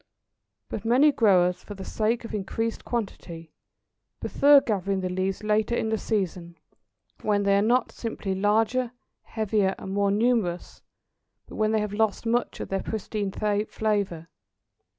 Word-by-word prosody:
But 210 Hz, -, -5 dB
many 255 Hz, +6 st, +5 dB
growers, 180 Hz, -7 st, +3 dB
for 205 Hz, -, -8 dB
the 190 Hz, -1 st, -8 dB
sake 225 Hz, +2 st, -1 dB
of -, -, -8 dB
increased 220 Hz, +3 st, -3 dB
quantity, 170 Hz, -8 st, -5 dB, 0.7 s
prefer 285 Hz, 0 st, +5 dB
gathering 195 Hz, -5 st, -1 dB
the 185 Hz, -1 st, -2 dB
leaves 190 Hz, +2 st, -2 dB
later 215 Hz, +2 st, +1 dB
in 220 Hz, -, -1 dB
the 220 Hz, -, +1 dB
season, 180 Hz, -5 st, -3 dB, 0.6 s
when 205 Hz, -1 st, +1 dB
they 200 Hz, 0 st, +3 dB
are 200 Hz, -, +3 dB
not 240 Hz, +4 st, +2 dB
simply 220 Hz, -4 st, -4 dB
larger, 225 Hz, +5 st, +1 dB, 0.3 s
heavier, 210 Hz, -3 st, 0 dB
and 190 Hz, -, -6 dB
more 200 Hz, 0 st, +2 dB
numerous, 205 Hz, -4 st, 0 dB, 0.6 s
but -, -, -11 dB
when 215 Hz, 0 st, +2 dB
they 220 Hz, -1 st, +2 dB
have 210 Hz, -1 st, -3 dB
lost 220 Hz, +1 st, 0 dB
much 235 Hz, +2 st, 0 dB
of -, -, -5 dB
their 195 Hz, 0 st, -1 dB
pristine 210 Hz, -2 st, -3 dB
flavour. 205 Hz, -4 st, -1 dB
210 Hz, 150 wpm, -26 LUFS, 195-225 Hz, 0.7 s, many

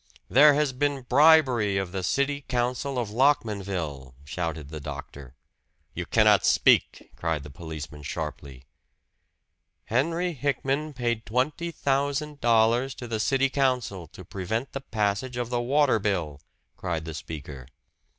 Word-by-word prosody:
"There 145 Hz, +6 st, +7 dB
has 150 Hz, -2 st, +1 dB
been 140 Hz, 0 st, -1 dB
bribery 130 Hz, -7 st, +4 dB
of 95 Hz, -2 st, -2 dB
the 95 Hz, 0 st, -3 dB
city 140 Hz, +9 st, 0 dB
council 125 Hz, +2 st, -1 dB
of 115 Hz, -4 st, -2 dB
Lockmanville," 100 Hz, -, 0 dB
shouted 80 Hz, -1 st, -4 dB
the 80 Hz, 0 st, -7 dB
doctor. 70 Hz, -2 st, -9 dB, 0.6 s
"You -, -, -5 dB
cannot -, -, +4 dB
speak!" -, -, +3 dB
cried 80 Hz, -3 st, -2 dB
the 75 Hz, -, -10 dB
policeman 75 Hz, -1 st, -8 dB
sharply. 70 Hz, -4 st, -6 dB, 1.2 s
"Henry 165 Hz, +9 st, 0 dB
Hickman 140 Hz, +2 st, -1 dB
paid 120 Hz, -3 st, -2 dB
twenty 145 Hz, +9 st, -1 dB
thousand 145 Hz, 0 st, -1 dB
dollars 120 Hz, +3 st, +3 dB
to 120 Hz, -, -8 dB
the 115 Hz, -2 st, -3 dB
city 135 Hz, +4 st, +1 dB
council 125 Hz, -, 0 dB
to 90 Hz, +4 st, -13 dB
prevent 110 Hz, +9 st, -3 dB
the 135 Hz, -, -5 dB
passage 110 Hz, +1 st, -2 dB
of 120 Hz, -1 st, -3 dB
the 120 Hz, -1 st, 0 dB
water 135 Hz, -1 st, +3 dB
bill!" 85 Hz, -9 st, -2 dB, 0.4 s
cried 85 Hz, -3 st, -3 dB
the 80 Hz, -, -6 dB
speaker. 70 Hz, -5 st, -8 dB
120 Hz, 135 wpm, -26 LUFS, 85-135 Hz, 1.2 s, There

